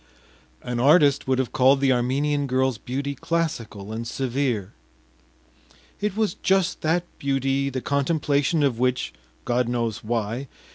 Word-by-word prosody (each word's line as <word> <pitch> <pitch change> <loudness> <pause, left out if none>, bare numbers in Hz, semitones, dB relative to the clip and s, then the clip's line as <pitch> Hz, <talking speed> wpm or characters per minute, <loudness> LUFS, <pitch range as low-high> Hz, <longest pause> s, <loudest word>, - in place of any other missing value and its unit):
An 120 -1 -3
artist 145 +1 +4
would 130 -1 +2
have 130 -2 -1
called 135 +2 +4
the 135 -1 +3
Armenian 140 +4 +1
girl’s 130 -3 +1
beauty 140 +3 -3
classical 125 -10 -3
and 115 +1 -4
severe, 125 -5 -2 1.3
it 210 -1 -2
was 215 -5 +1
just 190 -2 +1
that 165 +3 +1 0.2
beauty, 135 0 0
the 130 -1 -4
contemplation 145 +1 +1
of 130 -5 +1
which 125 - 0 0.3
God 125 -1 +1
knows 115 -2 -2
why! 115 +3 -2
135 Hz, 135 wpm, -24 LUFS, 120-145 Hz, 1.3 s, artist